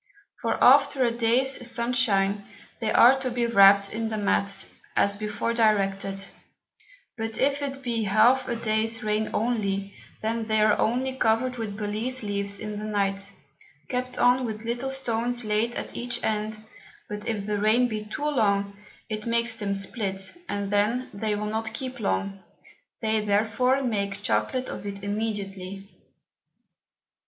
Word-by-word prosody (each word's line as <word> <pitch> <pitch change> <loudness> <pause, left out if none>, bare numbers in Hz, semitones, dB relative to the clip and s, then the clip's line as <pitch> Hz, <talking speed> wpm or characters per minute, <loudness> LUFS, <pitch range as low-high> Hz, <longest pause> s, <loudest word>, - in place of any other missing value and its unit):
For - - 0
after 275 0 +6
a 235 - +2
Day's 240 +2 +1
Sun 235 +1 -1
shine, 200 -5 +2 0.4
they 220 -2 -1
are 260 +3 +7
to 265 -1 -2
be 240 -1 0
wrap'd 200 -3 +6
in 225 0 -2
the 220 - -3
Mat, 200 -1 0 0.3
as 200 0 +2
before 210 +2 -2
directed; 195 -3 +1 0.9
but 225 0 -3
if 280 +2 +1
it 275 -1 -4
be 230 -3 -1
half 220 +6 +4
a 240 - -1
Day's 225 +1 -1
Rain 215 0 0
only, 200 -4 -1 0.3
then 225 +1 -1
they 220 0 +1
are 215 -1 +5
only 255 +4 +1
covered 250 +1 +1
with 210 -3 -4
Balize 220 +4 -3
Leaves 200 -1 -2
in 210 0 -5
the - - -6
Night, 200 -1 -1 0.6
kept 255 0 -3
on 250 +1 +4
with 220 -2 -4
little 240 +3 -2
Stones 245 -2 -1
laid 215 +3 0
at - - -6
each 240 0 -2
End: 215 0 -1 0.5
But 210 0 -6
if 210 -3 -2
the 210 0 -1
Rain 220 +4 +4
be 215 -2 -4
too 250 +8 -5
long, 200 -7 +1 0.3
it 215 +1 -5
makes 235 0 +1
them 205 -3 -2
split, 195 - -4
and 200 -1 -3
then 215 +5 +1
they 210 +1 -1
will 210 +1 -3
not 220 +1 -2
keep 255 -3 -5
long; 195 -2 -1 0.6
they 220 -1 +1
therefore 225 +6 +2
make 200 -4 -2
Chocolate 255 +3 0
of - - -6
it 200 -1 -6
immediately. 200 -2 -4
220 Hz, 155 wpm, -26 LUFS, 205-240 Hz, 0.9 s, are